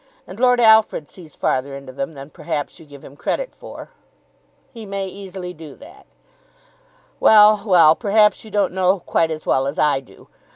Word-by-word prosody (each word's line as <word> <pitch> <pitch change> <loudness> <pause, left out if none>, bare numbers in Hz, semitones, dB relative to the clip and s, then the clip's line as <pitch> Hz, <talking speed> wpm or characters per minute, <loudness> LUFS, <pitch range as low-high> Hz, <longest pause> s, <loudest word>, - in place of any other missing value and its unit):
And 185 +4 -12
Lord 250 -1 +3
Alfred 220 - +3
sees 165 -5 -15
farther 135 +1 -2
into 135 -1 -11
them 140 +4 -5
than 140 +2 -11
perhaps 155 -4 -5
you 160 - -16
give 140 -2 -14
him 140 - -14
credit - - -4
for." - - -12 0.8
"He 230 -2 -10
may 195 -1 -4
easily 190 -1 -8
do 160 -3 -12
that." 290 - -17 1.1
"Well, 210 -1 +6
well. 170 -5 +6
Perhaps 210 +1 +1
you 220 - -12
don't 205 -3 -1
know 185 0 +2
him - - -12
quite 165 -1 0
as 155 -1 -6
well 135 +1 0
as 140 - -5
I 145 -3 +2
do." 135 - -19
180 Hz, 180 wpm, -19 LUFS, 145-210 Hz, 1.1 s, Well